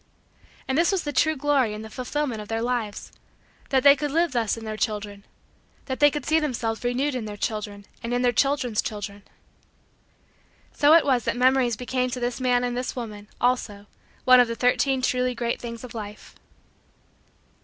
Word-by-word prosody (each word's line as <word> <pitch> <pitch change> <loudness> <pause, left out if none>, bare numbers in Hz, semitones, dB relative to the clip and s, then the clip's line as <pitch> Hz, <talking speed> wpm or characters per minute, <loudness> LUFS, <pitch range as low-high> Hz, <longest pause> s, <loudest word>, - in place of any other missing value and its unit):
And 265 - 0
this 335 +5 +3
was 385 -3 0
the 290 - -4
true 315 +4 +2
glory 275 -6 +1
and 215 +1 -7
the - - -7
fulfillment 255 -2 -3
of 210 - -9
their 225 +1 -2
lives 235 -4 -3 0.6
that 265 -2 +2
they 280 0 +8
could 295 +1 -3
live 335 +2 +1
thus 235 -3 0
in 225 - -8
their 215 0 -4
children 205 -2 -3 0.6
that 260 -1 -4
they 290 - +7
could 295 -2 -5
see 315 +1 +3
themselves 235 -7 -2
renewed 255 +4 0
in 250 -4 -3
their 210 -1 -7
children 205 -2 -4 0.2
and 230 - -4
in 245 +1 0
their 245 - +4
children's 255 -3 +1
children. 205 -1 -6 1.5
So 295 +2 +5
it 335 - +5
was 255 -4 +2
that - - -1
Memories 250 -2 +3
became 255 +1 -1
to 250 - -4
this 245 +1 -3
man 250 -1 +2
and 245 0 -2
this 250 +1 -3
woman, 210 -4 -7
also, 235 -5 0 0.4
one 255 0 +8
of 245 - +5
the 230 - -3
Thirteen 255 +2 +1
Truly 250 0 +1
Great 235 0 -2
Things 235 -1 -7
of 250 - -9
Life. 210 -2 -8
245 Hz, 190 wpm, -25 LUFS, 225-265 Hz, 1.5 s, they